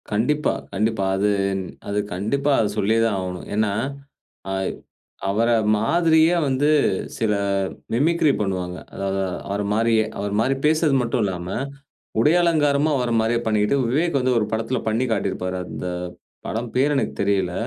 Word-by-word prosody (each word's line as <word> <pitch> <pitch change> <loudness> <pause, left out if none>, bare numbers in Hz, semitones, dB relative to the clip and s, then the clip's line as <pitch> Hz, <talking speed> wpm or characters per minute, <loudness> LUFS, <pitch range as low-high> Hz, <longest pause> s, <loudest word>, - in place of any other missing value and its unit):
கண்டிப்பா, 135 +9 +1 0.2
கண்டிப்பா. 110 0 0
அது 100 +2 +1 0.6
அது 100 0 -1
கண்டிப்பா 140 +10 0
அத 110 -2 +2
சொல்லியே 110 +2 +2
தான் 110 -3 0
ஆவணும். 90 -1 -6
ஏன்னா 105 -1 +1 0.8
ஆய்வ் 95 -1 -2 0.5
அவர 110 +4 +2 0.3
மாதிரியே 160 +7 +3
வந்து 135 +1 +1 0.5
சிலர் 100 -3 0 0.2
மிமிக்ரி 155 +4 +3
பண்ணுவாங்க. 90 -3 -2 0.2
அதாவது 95 0 -2 0.3
அவர 100 +1 -2
மாரியே, 110 0 +2
அவர 100 0 -2
மாரி 130 +4 +2
பேசுறது 155 -2 +3
மட்டுல்லாம, 105 -8 -1 0.7
உடையலங்காரமும் 150 0 +3
அவர 125 -2 -1
மாரியே 115 +1 +1
பண்ணிக்கிட்டு, 105 +4 +2
விவேக் 155 +4 +1
வந்து 130 0 +1
ஒரு 105 - 0
படத்துல 115 +3 -1
பண்ணி 110 +4 +1
காட்டியிருப்பாரு. 95 -3 -1
அந்த - - -7 0.6
படம் 115 +1 -3
பேரு 140 +3 +3
எனக்கு - - -1
தெரியல. 95 -3 +1
110 Hz, 130 wpm, -22 LUFS, 100-140 Hz, 0.8 s, மாதிரியே